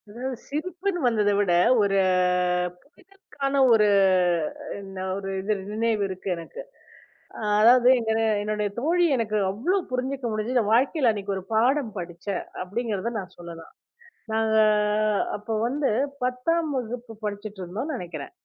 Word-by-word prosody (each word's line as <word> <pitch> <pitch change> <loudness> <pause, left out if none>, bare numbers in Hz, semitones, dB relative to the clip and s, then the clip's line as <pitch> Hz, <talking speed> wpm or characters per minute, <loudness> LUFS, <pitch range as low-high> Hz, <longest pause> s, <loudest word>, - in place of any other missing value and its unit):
அதாவது, 250 +4 -5
சிரிப்புன்னு 360 +5 -3
வந்ததை 210 -3 +2
விட 200 -3 +2 0.3
ஒரு 200 -1 +2 1.0
புரிதலுக்கான 360 -8 -6 0.2
ஒரு 210 -2 +5 0.9
என்ன 195 -1 -9 0.2
ஒரு 195 -1 -5
இது 210 +3 0 0.2
நினைவு 220 -1 0
இருக்கு 190 0 -8
எனக்கு. 170 - -9 0.8
அ - - -7 0.2
அதாவது, 245 +2 +6
எங்கன 220 -1 0 0.2
என்னுடைய 210 0 -1
தோழி 340 +7 +2
எனக்கு 215 -2 -1
அவ்வளோ 310 - 0
புரிஞ்சுக்க 260 +1 -2
முடிஞ்சதுன்னு 215 0 0
வாழ்க்கையில 260 +1 +3
அன்னைக்கு 200 -2 -4
ஒரு 190 - -6
பாடம் 245 +2 +2
படிச்சேன் 175 +2 -5 0.2
அப்படிங்கிறத 220 +2 -3
நான் 185 -1 -9
சொல்லலாம். 170 -1 -10 0.6
நாங்க 220 0 +2 0.8
அப்ப 210 +2 -17 0.2
வந்து 280 +3 0 0.3
10 305 +7 0
வகுப்பு 245 -1 -5
படிச்சிட்டு 205 0 -5
இருந்தோம்னு 225 - -4
நினைக்கிறேன். 170 -7 -7
220 Hz, 125 wpm, -25 LUFS, 200-260 Hz, 1.0 s, அதாவது